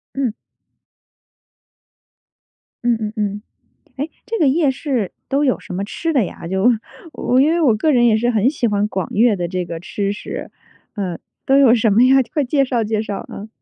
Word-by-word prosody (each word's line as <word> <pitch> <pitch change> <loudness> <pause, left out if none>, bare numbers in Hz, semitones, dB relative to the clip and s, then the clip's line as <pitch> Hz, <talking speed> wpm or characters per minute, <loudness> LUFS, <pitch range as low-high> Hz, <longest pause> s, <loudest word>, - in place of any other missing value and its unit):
嗯。 260 -5 -1 2.5
嗯 240 -1 +3
嗯 215 0 -4
嗯。 205 -1 -2 0.6
诶， 290 +4 -3 0.2
这 455 - -2
个 300 -5 +4
夜 290 0 +3
市 260 - -2 0.2
都 285 +2 +1
有 255 - +2
什 - - -10
么 195 +2 -2
吃 325 +10 -3
的 255 -8 +3
呀？ 170 - -8
就 190 +4 0 0.5
我 255 +1 +1
因 300 +3 +4
为 340 +1 +1
我 255 -8 +4
个 310 +8 +1
人 240 -2 +4
也 220 -2 +4
是 240 +2 +1
很 220 +2 +2
喜 245 -5 -1
欢 205 -1 +1
广 190 -4 -3
粤 220 -1 +3
的 175 -1 -3
这 180 0 -2
个 170 -1 -6
吃 200 +1 -2
食， 205 - -7 0.4
呃， 185 -5 -3 0.3
都 270 +1 +4
有 250 -4 +6
什 225 -2 +2
么 220 +5 +4
呀？ 265 +1 +5 0.2
快 295 - +1
介 275 +2 +2
绍 245 -3 0
介 215 0 -1
绍， 205 -2 -4
啊。 210 +2 -8
230 Hz, 205 characters per minute, -19 LUFS, 205-270 Hz, 2.5 s, 有